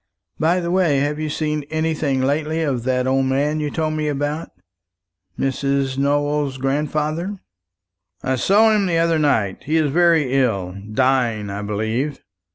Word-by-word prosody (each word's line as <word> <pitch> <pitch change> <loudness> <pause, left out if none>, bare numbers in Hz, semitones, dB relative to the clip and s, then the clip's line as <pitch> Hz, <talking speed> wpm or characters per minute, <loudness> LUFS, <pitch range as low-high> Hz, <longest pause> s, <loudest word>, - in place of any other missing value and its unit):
By 170 +3 +2
the 170 -1 -2
way, 175 -6 +3
have 145 +2 -1
you 155 0 -2
seen 150 0 -1
anything 155 -4 0
lately 155 +4 0
of 130 -6 -2
that 125 -1 +1
old 135 +1 +2
man 145 +3 0
you 150 -1 -1
told 155 +1 -1
me 155 -1 -2
about 145 +2 -2 0.9
Miss 135 -1 -1 0.3
Nowell's 145 0 0
grandfather?" 150 +7 -1 0.9
"I 130 0 0
saw 215 - +4
him 200 -2 +1
the 170 -2 +1
other 165 -1 +2
night. 110 -10 0
He 155 +3 +1
is 155 -3 +1
very 165 -5 +3
ill 100 -9 0 0.2
dying, 120 -4 +1
I 100 +1 -4
believe. 110 +7 -2
145 Hz, 155 wpm, -20 LUFS, 130-155 Hz, 0.9 s, saw